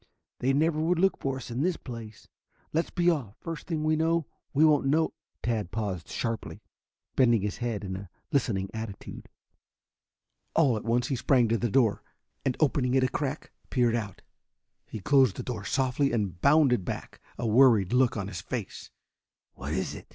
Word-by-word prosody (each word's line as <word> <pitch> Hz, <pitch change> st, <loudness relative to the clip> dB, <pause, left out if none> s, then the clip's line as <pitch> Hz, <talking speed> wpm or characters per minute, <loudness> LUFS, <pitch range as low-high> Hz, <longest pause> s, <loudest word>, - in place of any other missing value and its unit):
"They 130 Hz, -, +2 dB
never 155 Hz, +3 st, +2 dB
would 170 Hz, +2 st, +2 dB
look 190 Hz, +3 st, +2 dB
for 135 Hz, -1 st, -2 dB
us 125 Hz, -2 st, -8 dB
in 120 Hz, +3 st, -2 dB
this 180 Hz, +1 st, +1 dB
place. 115 Hz, -4 st, -9 dB, 0.5 s
Let's 165 Hz, +2 st, +1 dB
be 175 Hz, 0 st, 0 dB
off. 125 Hz, -, -3 dB
First 165 Hz, -1 st, -6 dB
thing 160 Hz, -3 st, -2 dB
we 155 Hz, 0 st, +2 dB
know, 165 Hz, 0 st, +1 dB, 0.3 s
we 150 Hz, +3 st, +4 dB
won't 150 Hz, -3 st, +4 dB
know 155 Hz, +3 st, +2 dB
" -, -, -54 dB
Tad 110 Hz, -6 st, -1 dB
paused 100 Hz, -6 st, -3 dB
sharply, 115 Hz, -2 st, -4 dB, 0.5 s
bending 120 Hz, -6 st, +4 dB
his 105 Hz, -, -2 dB
head 115 Hz, -4 st, -3 dB
in 95 Hz, -1 st, -4 dB
a 95 Hz, -1 st, -8 dB, 0.2 s
listening 110 Hz, -9 st, 0 dB
attitude. 110 Hz, -3 st, -7 dB, 1.3 s
All 140 Hz, -7 st, +4 dB
at 110 Hz, -, -4 dB
once 120 Hz, +1 st, +1 dB
he 135 Hz, -, +1 dB
sprang 125 Hz, -1 st, +3 dB
to 115 Hz, -, +2 dB
the 120 Hz, -, 0 dB
door, 110 Hz, -3 st, +2 dB, 0.4 s
and 130 Hz, -2 st, 0 dB
opening 135 Hz, -4 st, +2 dB
it 130 Hz, -, +4 dB
a 130 Hz, -, +2 dB
crack 145 Hz, +2 st, -3 dB, 0.2 s
peered 120 Hz, -3 st, +2 dB
out. 105 Hz, -5 st, -4 dB, 0.6 s
He 110 Hz, -, -7 dB
closed 130 Hz, -3 st, +4 dB
the -, -, -5 dB
door 110 Hz, -5 st, -5 dB
softly 135 Hz, +3 st, +1 dB
and 100 Hz, -7 st, -2 dB
bounded 140 Hz, -7 st, +4 dB
back, -, -, -6 dB, 0.2 s
a 120 Hz, -, -3 dB
worried 115 Hz, -4 st, +5 dB
look 125 Hz, -2 st, +3 dB
on 100 Hz, -2 st, -3 dB
his 90 Hz, -4 st, -6 dB
face. 110 Hz, +1 st, -6 dB, 0.6 s
"What 70 Hz, +3 st, -6 dB
is 95 Hz, +4 st, -1 dB
it?" -, -, -10 dB
125 Hz, 185 wpm, -28 LUFS, 110-145 Hz, 1.3 s, worried